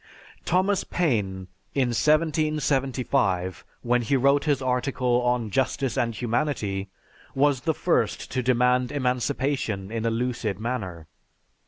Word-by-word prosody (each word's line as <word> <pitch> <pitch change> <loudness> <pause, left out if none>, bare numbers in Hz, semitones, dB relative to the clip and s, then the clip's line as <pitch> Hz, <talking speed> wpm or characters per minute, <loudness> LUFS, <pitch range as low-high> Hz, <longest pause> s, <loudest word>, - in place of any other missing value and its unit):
Thomas 185 +3 +2
Paine, 100 - -1 0.3
in 130 -3 +2
1775, 135 - +1 0.2
when 120 0 +2
he 125 +4 +1
wrote 140 +3 +3
his 145 -3 +2
article 125 -1 0
on 125 -3 0
"Justice 130 +2 0
and 115 -2 0
Humanity," 110 -5 -1 0.5
was 140 -1 +2
the 160 0 0
first - - 0
to 130 - 0
demand 125 0 +2
emancipation 125 -5 -1
in 115 -1 -3
a 115 - +2
lucid 115 -4 -2
manner. 100 -9 -4
125 Hz, 120 wpm, -25 LUFS, 115-140 Hz, 0.5 s, wrote